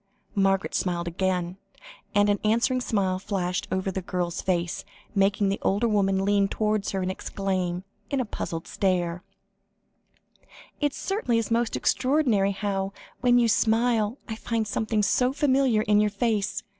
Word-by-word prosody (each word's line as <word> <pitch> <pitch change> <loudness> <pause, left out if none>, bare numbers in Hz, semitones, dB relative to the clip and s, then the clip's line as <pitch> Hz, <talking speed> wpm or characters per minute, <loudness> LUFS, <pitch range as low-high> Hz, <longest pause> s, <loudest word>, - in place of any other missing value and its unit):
Margaret 195 -1 +1
smiled 175 -2 -1
again, 180 0 -1 0.6
and 205 0 +5
an 205 0 +2
answering 235 +4 +2
smile 190 -6 0
flashed 185 -2 -2
over 190 +1 -1
the 190 - -3
girl's 180 -2 -2
face, 175 -1 -1 0.3
making 200 0 +2
the 200 - -1
older 205 +5 +1
woman 195 -3 +2
lean 200 0 +3
towards 215 0 0
her, 190 -1 -2
and 185 - -1
exclaim, 185 -2 -2 0.3
with 275 - 0
a 255 - 0
puzzled 165 -5 -5
stare 180 -2 0 1.6
"It 290 -2 0
certainly 390 - -1
is 230 0 -2
most 230 0 +1
extraordinary 255 -8 +2
how, 195 -1 -2 0.3
when 245 0 +4
you 240 -1 +4
smile, 225 +1 +2
I 220 - -4
find 225 -1 -2
something 215 0 0
so 250 +5 +2
familiar 270 -6 +2
in 210 -1 +3
your 210 - +2
face. 210 -1 -1
205 Hz, 150 wpm, -26 LUFS, 190-230 Hz, 1.6 s, and